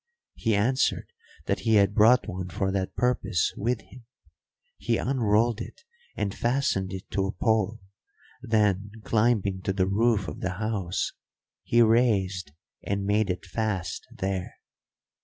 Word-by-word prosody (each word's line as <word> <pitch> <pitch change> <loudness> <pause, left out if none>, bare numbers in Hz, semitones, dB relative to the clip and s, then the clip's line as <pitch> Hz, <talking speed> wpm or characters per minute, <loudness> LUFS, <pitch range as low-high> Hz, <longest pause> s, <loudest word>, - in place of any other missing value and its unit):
He 115 -3 0
answered 125 +6 +1 0.3
that - - 0
he 110 -1 +2
had 100 -1 +4
brought 115 +4 +5
one 90 0 -5
for 95 +2 -1
that 95 -1 -2
purpose 125 -8 +1
with 115 +2 -1
him. 125 -1 -15 0.8
He - - 0
unrolled 115 -3 +1
it - - -9 0.3
and 100 -1 -2
fastened 120 -7 0
it 95 -1 -8
to 95 -1 0
a - - -2
pole; 110 -1 0 0.6
then, 105 -3 +1
climbing 105 -4 +1
to 95 - -1
the 95 -1 +1
roof 105 0 +1
of 75 - -6
the 95 -1 -2
house, 95 -3 -2 0.5
he 120 0 +4
raised 100 -7 +2 0.3
and 100 0 -2
made 105 +1 +1
it 90 +2 -3
fast 95 -4 -3
there. 95 -1 -3
105 Hz, 140 wpm, -27 LUFS, 95-115 Hz, 0.8 s, brought